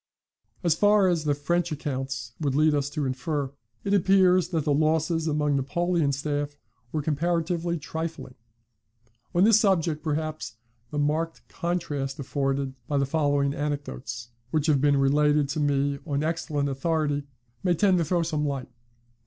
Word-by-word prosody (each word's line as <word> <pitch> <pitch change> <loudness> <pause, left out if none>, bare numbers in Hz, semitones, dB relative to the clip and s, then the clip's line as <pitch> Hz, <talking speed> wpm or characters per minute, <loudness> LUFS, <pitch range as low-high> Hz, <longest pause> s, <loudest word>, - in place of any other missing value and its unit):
["As 170 -3 +4
far 205 +3 +4
as 165 -3 0
the 145 -1 +2
French 175 +4 0
accounts 135 -5 -4
would 140 -4 0
lead 155 +1 +4
us 140 -1 0
to 145 -1 -2
infer, 135 +2 -2 0.3
it 200 - 0
appears 185 -2 +4
that 165 -4 -1
the 145 - +1
losses 160 +2 +1
among 150 -2 +1
Napoleon's 150 +1 0
staff 145 0 -2 0.3
were 155 -2 -2
comparatively 170 +2 0
trifling. 160 -3 -5 1.0
On 175 - +5
this 220 0 +6
subject 170 -7 +1
perhaps 155 -6 -3 0.3
the 150 - -5
marked 155 +3 -1
contrast 150 -6 -3
afforded 135 -1 -1
by 145 - 0
the 140 - +2
following 145 -1 +1
anecdotes, 120 - -4 0.2
which 150 +2 0
have 150 -4 +3
been 145 -1 +4
related 145 +1 +3
to 155 - -2
me 140 -1 +1
on 145 -1 0
excellent 155 -3 -1
authority, 145 0 -1 0.3
may 180 -2 +2
tend 190 0 +3
to - - +2
throw 170 +2 +1
some 155 -2 -1
light. 140 -3 -3
150 Hz, 155 wpm, -26 LUFS, 140-165 Hz, 1.0 s, this